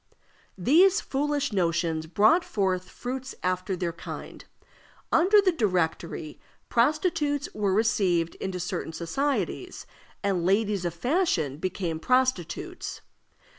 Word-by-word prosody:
These 340 - +5
foolish 285 -2 -1
notions 170 -3 0
brought 215 - +4
forth 190 - -1
fruits 260 +1 -6
after 185 +1 -1
their 175 -1 -2
kind. 170 - -8 0.7
Under 380 +6 +5
the 380 -2 +3
Directory, 175 - -1 0.3
prostitutes 295 +2 +1
were 200 -3 0
received 185 -6 +2
into 190 -1 -3
certain 180 -2 -4
societies, 270 - -2 0.4
and 195 -4 0
ladies 200 0 +1
of 170 -1 -2
fashion 180 - 0
became 170 -1 -3
prostitutes. 255 - -1
195 Hz, 105 wpm, -27 LUFS, 175-280 Hz, 0.7 s, These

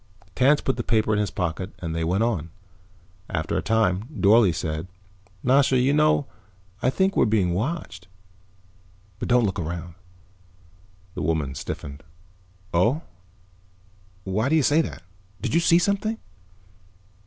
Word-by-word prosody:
Tance 140 +3 +3
put 135 - -1
the 120 - -2
paper 110 -1 +1
in 105 - +1
his 105 - 0
pocket 90 +1 -3
and 85 -3 -5
they 80 0 -2
went 90 +6 +1
on. 95 -9 -1 0.8
After 80 -3 -2
a - - +1
time 110 -3 +1
Dorle 105 -1 +5
said, 80 +1 -4 0.6
"Nasha, 130 0 +4
you 130 +3 +3
know, 150 -1 +3 0.6
I 130 - +2
think 190 +8 +1
we're - - +4
being 100 -5 +1
watched. 105 - -4 1.1
But - - -3
don't 125 0 +4
look 95 -1 -2
around." 85 +1 -5 1.2
The - - -5
woman 75 -3 -1
stiffened. 70 +2 -7 0.7
"Oh? 115 - +2 1.2
Why 105 +7 -1
do 160 - +3
you 155 - +3
say 150 +5 +4
that? 90 - -7 0.4
Did - - -3
you 165 - +4
see 170 0 +4
something?" 200 +4 0
110 Hz, 140 wpm, -24 LUFS, 85-135 Hz, 1.2 s, Dorle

